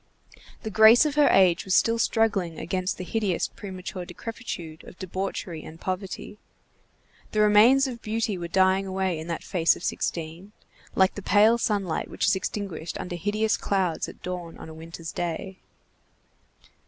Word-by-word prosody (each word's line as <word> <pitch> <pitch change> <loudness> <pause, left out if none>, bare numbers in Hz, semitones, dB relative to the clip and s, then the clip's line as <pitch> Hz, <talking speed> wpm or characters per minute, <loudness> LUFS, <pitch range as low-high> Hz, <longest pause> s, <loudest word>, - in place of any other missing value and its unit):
The 220 - -4
grace 220 +6 +7
of 300 - 0
her 295 -1 +4
age 185 -3 +4
was 190 - +1
still 230 0 +3
struggling 205 -8 +1
against 185 +1 -2
the 185 - -5
hideous, 200 -2 -1
premature 185 -2 -7
decrepitude 175 -4 -7
of - - -13
debauchery 185 -3 -4
and 160 +1 -11
poverty. 190 +3 -5 0.9
The 215 - +1
remains 215 +6 +6
of 245 -3 -5
beauty 220 -1 -1
were 175 -1 -5
dying 190 +2 +2
away 190 -3 -1
in 160 - -7
that 170 -1 -4
face 170 -4 +2
of - - -11
sixteen, 170 +5 -4 0.4
like 190 -1 +4
the 205 - -7
pale 215 +4 +4
sunlight 200 -7 -1
which - - -1
is - - +4
extinguished 190 -4 -4
under 180 -1 -5
hideous 210 +5 0
clouds 185 -4 -1
at - - -14
dawn 180 -2 -6
on - - -10
a - - -9
winter's 165 0 -8
day. 175 +2 -4
190 Hz, 160 wpm, -26 LUFS, 175-215 Hz, 0.9 s, grace